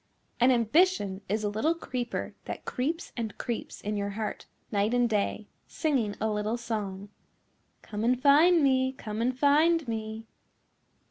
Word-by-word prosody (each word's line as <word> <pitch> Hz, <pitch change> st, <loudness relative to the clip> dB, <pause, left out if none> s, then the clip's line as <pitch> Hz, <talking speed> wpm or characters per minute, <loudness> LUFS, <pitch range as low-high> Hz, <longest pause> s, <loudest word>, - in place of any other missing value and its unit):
An 245 Hz, +2 st, +5 dB
ambition 235 Hz, -, +2 dB
is 215 Hz, +2 st, 0 dB
a -, -, +1 dB
little 265 Hz, +11 st, +1 dB
creeper 250 Hz, -7 st, -4 dB
that -, -, -6 dB
creeps 315 Hz, +7 st, -2 dB
and 225 Hz, -3 st, -4 dB
creeps 235 Hz, -2 st, -5 dB
in 210 Hz, +1 st, -3 dB
your 200 Hz, 0 st, -2 dB
heart 210 Hz, +1 st, -5 dB, 0.2 s
night 210 Hz, +3 st, +1 dB
and 245 Hz, -1 st, +3 dB
day, 210 Hz, -1 st, -1 dB, 0.2 s
singing 255 Hz, -10 st, 0 dB
a 220 Hz, -, 0 dB
little 215 Hz, +2 st, -1 dB
song, 205 Hz, -4 st, -4 dB, 0.7 s
"Come 210 Hz, 0 st, -5 dB
and 250 Hz, +2 st, +2 dB
find 305 Hz, +5 st, +6 dB
me, 260 Hz, -1 st, +3 dB
come 215 Hz, -3 st, -5 dB
and 250 Hz, +2 st, 0 dB
find 305 Hz, +2 st, +4 dB
me." 220 Hz, 0 st, -4 dB
235 Hz, 150 wpm, -28 LUFS, 210-275 Hz, 0.7 s, find